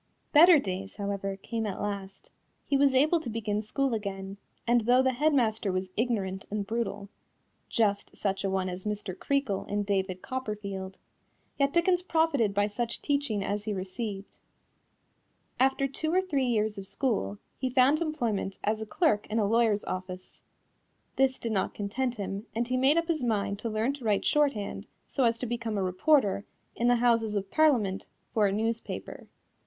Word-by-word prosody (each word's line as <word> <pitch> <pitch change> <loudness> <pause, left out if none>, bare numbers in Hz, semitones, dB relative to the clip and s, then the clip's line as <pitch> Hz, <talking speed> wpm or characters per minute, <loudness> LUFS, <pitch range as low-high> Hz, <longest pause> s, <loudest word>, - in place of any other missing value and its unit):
Better 330 +2 +8
days, 195 -5 -4
however, 200 -1 -3
came 225 +2 -3
at 195 - -4
last. 200 -1 -5 0.3
He 280 - 0
was 275 -1 +4
able 310 +6 +4
to 275 - -6
begin 215 -2 -2
school 265 +4 0
again, 195 -2 -4 0.3
and 240 0 +4
though 245 +3 +4
the 260 0 +2
head 300 +5 +2
master 220 -7 +1
was 185 0 -3
ignorant 200 -5 -1
and 205 -1 -2
brutal 205 -2 -3 0.6
(just 205 -3 0
such 195 -1 -1
a 195 - 0
one 190 -1 0
as 180 0 -5
Mr. 210 -3 -3
Creakle 275 -3 -1
in 205 0 -1
David 190 -2 -1
Copperfield) 200 -6 -5 0.6
yet 280 0 +3
Dickens 350 +2 +3
profited 320 - +2
by 205 +1 +2
such 230 +3 -3
teaching 280 -8 0
as 205 +1 -2
he 215 - -1
received. 195 +1 -5 1.2
After 270 +1 +3
two 315 +4 -3
or 365 - +4
three 290 -9 0
years 215 -3 0
of 195 - -8
school, 200 - -1 0.2
he 260 - -1
found 265 +5 +4
employment 235 -12 -1
as 215 +1 0
clerk 265 - +2
in 215 - -2
a 215 - +3
lawyer's 220 -1 +2
office. 185 0 -6 0.7
This 265 -1 +2
did 230 - -4
not 195 -3 -1
content 240 +5 -2
him 200 +1 -5
and 235 +1 0
he 255 - 0
made 265 +5 +4
up 335 0 +1
his 325 -4 0
mind 205 -4 0
to 230 - -3
learn 220 +5 0
to 280 -3 -10
write 210 -2 +1
shorthand 285 -9 +1 0.2
so 265 - +1
as 230 0 +2
to 250 - -4
become 230 -2 -3
a 195 - 0
reporter, 200 - +2 0.3
in 240 - +1
the 245 - +5
Houses 230 -3 +2
of 195 -1 -3
Parliament, 240 -12 +2 0.3
for 215 -2 +3
a - - 0
newspaper. 225 +3 -3
220 Hz, 175 wpm, -29 LUFS, 200-260 Hz, 1.2 s, Better